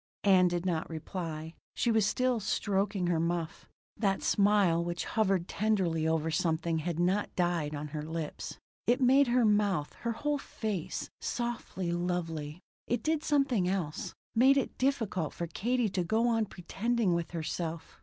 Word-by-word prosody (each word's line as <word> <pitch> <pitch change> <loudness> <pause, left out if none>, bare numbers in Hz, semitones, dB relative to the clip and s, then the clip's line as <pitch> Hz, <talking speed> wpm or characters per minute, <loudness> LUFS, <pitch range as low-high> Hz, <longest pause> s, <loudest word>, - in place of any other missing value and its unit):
Ann 185 -3 +6
did 175 0 -1
not 170 -3 -1
reply; 160 -1 -5 0.2
she 235 - +2
was 220 -3 +3
still 250 +1 +1
stroking 200 -1 0
her 175 -2 +1
muff; 170 0 -2 0.3
that 195 -3 0
smile 200 -5 +3
which 175 0 -3
hovered 195 -5 +1
tenderly 185 -7 +1
over 160 0 +1
something 165 0 0
had 165 +1 -3
not 185 +4 +1
died 170 -4 0
on 150 +1 -5
her 150 +1 -4
lips. 160 0 -5 0.3
It 245 +3 +4
made 270 +2 +5
her 240 0 +3
mouth, 205 -8 +2
her 235 -1 -1
whole 295 +4 -1
face, 210 -10 -4
softly 235 -7 -3
lovely. 170 -3 -2 0.3
It 240 - -1
did 315 -1 0
something 275 - +2
else. 175 -6 -3 0.2
Made 265 +4 +5
it 275 - -1
difficult 225 - 0
for 170 - -3
Katie 240 +7 0
to 185 -1 -1
go 220 +7 +2
on 225 -2 +1
pretending 210 +3 -1
with 170 -1 -1
herself. 165 0 -4
185 Hz, 155 wpm, -31 LUFS, 165-225 Hz, 0.3 s, Ann